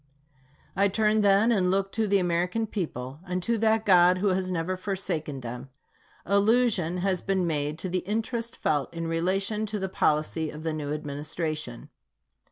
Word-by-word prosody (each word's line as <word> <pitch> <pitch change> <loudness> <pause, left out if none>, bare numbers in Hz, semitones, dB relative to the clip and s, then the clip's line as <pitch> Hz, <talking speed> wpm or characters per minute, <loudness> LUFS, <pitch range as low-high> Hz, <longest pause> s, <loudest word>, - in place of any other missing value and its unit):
I 200 +2 +4
turn, 215 +2 +2
then, 205 +3 +4
and 190 -5 +2
look 195 +1 +1
to 220 -1 0
the 200 0 +3
American 180 +4 0
people, 145 - -5
and 180 0 -2
to 235 +3 +1
that 220 0 +2
God 180 -1 +6
who 200 +2 +1
has 185 0 0
never 180 +1 -1
forsaken 180 -7 -3
them. 125 +2 -7 0.6
Allusion 200 -3 +2
has 185 -3 +1
been 190 -2 0
made 150 -2 -1
to 175 - -4
the 185 0 0
interest 225 +4 -3
felt 145 -3 0
in 165 0 -3
relation 195 +6 0
to 210 0 -3
the 190 -1 -3
policy 155 -1 0
of 155 +1 -8
the 160 -1 -1
new 150 -2 -4
Administration. 150 -2 -4
185 Hz, 170 wpm, -27 LUFS, 155-200 Hz, 0.6 s, God